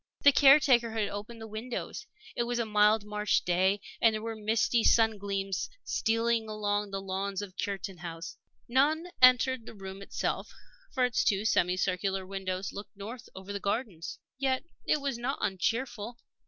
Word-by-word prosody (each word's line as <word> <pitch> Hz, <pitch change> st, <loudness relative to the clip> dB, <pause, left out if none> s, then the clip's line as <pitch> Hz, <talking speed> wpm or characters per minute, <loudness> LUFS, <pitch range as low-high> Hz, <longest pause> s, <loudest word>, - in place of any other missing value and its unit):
The 285 Hz, -, +8 dB
caretaker 270 Hz, -5 st, +6 dB
had 220 Hz, -2 st, 0 dB
opened 210 Hz, +3 st, -7 dB
the 225 Hz, -, -7 dB
windows. 220 Hz, +3 st, -5 dB, 0.3 s
It -, -, 0 dB
was 240 Hz, 0 st, -1 dB
a 235 Hz, -, 0 dB
mild 210 Hz, 0 st, +3 dB
March 210 Hz, 0 st, 0 dB
day, 185 Hz, +3 st, +2 dB, 0.2 s
and 225 Hz, -1 st, +5 dB
there 215 Hz, -, -3 dB
were 225 Hz, 0 st, -4 dB
misty 220 Hz, +2 st, +1 dB
sun 225 Hz, -2 st, +4 dB
gleams 195 Hz, -1 st, -2 dB
stealing 230 Hz, 0 st, 0 dB
along 205 Hz, -1 st, -1 dB
the 195 Hz, 0 st, -3 dB
lawns 195 Hz, +1 st, -3 dB
of 190 Hz, -2 st, -9 dB
Cureton 195 Hz, -2 st, -4 dB
House. 165 Hz, -1 st, -7 dB, 0.3 s
None 305 Hz, +8 st, +2 dB
entered 255 Hz, -1 st, +5 dB
the -, -, -9 dB
room 195 Hz, -1 st, -8 dB
itself, 200 Hz, -, -3 dB, 0.4 s
for 255 Hz, -3 st, +2 dB
its 235 Hz, -4 st, +1 dB
two 205 Hz, +1 st, +1 dB
semi 180 Hz, -4 st, +2 dB
circular 190 Hz, +1 st, -1 dB
windows 190 Hz, 0 st, -4 dB
looked 200 Hz, 0 st, -9 dB
north 230 Hz, +5 st, -8 dB
over 190 Hz, +1 st, -7 dB
the 200 Hz, -, -3 dB
gardens. 200 Hz, -5 st, -3 dB, 0.2 s
Yet 260 Hz, -1 st, +1 dB, 0.2 s
it 300 Hz, -, +2 dB
was 275 Hz, -4 st, -2 dB
not 255 Hz, +3 st, -2 dB
uncheerful. 230 Hz, +3 st, -2 dB
210 Hz, 170 wpm, -30 LUFS, 195-235 Hz, 0.4 s, The